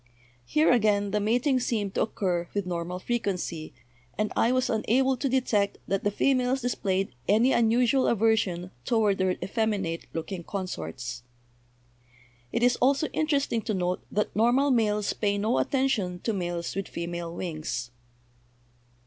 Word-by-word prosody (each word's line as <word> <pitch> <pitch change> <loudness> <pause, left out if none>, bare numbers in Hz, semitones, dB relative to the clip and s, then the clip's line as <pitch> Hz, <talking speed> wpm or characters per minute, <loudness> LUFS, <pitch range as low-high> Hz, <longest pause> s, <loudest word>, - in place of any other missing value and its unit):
Here, 310 +1 +3
again, 210 -4 +2
the 210 - +1
mating 245 +6 +2
seemed 210 -5 -1
to - - 0
occur 180 -5 -1
with 200 -2 0
normal 175 0 -3
frequency, 185 -7 -3 0.5
and 215 0 -1
I 230 - +3
was 255 0 +2
unable 260 +4 +2
to 270 +2 -2
detect 220 -6 +1
that 195 0 -1
the 205 - +2
females 255 +4 +1
displayed 195 - -1
any 225 +6 +4
unusual 240 +3 +3
aversion 200 -5 +1
toward 215 -4 +2
their 185 -1 +2
effeminate 200 -6 -1
looking 170 +2 -5
consorts. 120 - -5 1.3
"It 235 - 0
is 245 0 +4
also 275 +4 +2
interesting 285 -6 0
to 215 - -2
note 180 0 -1
that 210 +1 -1
normal 245 +6 +3
males 210 -4 +1
pay 205 -1 0
no 215 +4 +1
attention 235 -10 0
to 225 - -1
males 175 -3 -3
with 195 -1 -3
female 170 0 -5
wings. 155 -9 -4
210 Hz, 140 wpm, -27 LUFS, 180-245 Hz, 1.3 s, any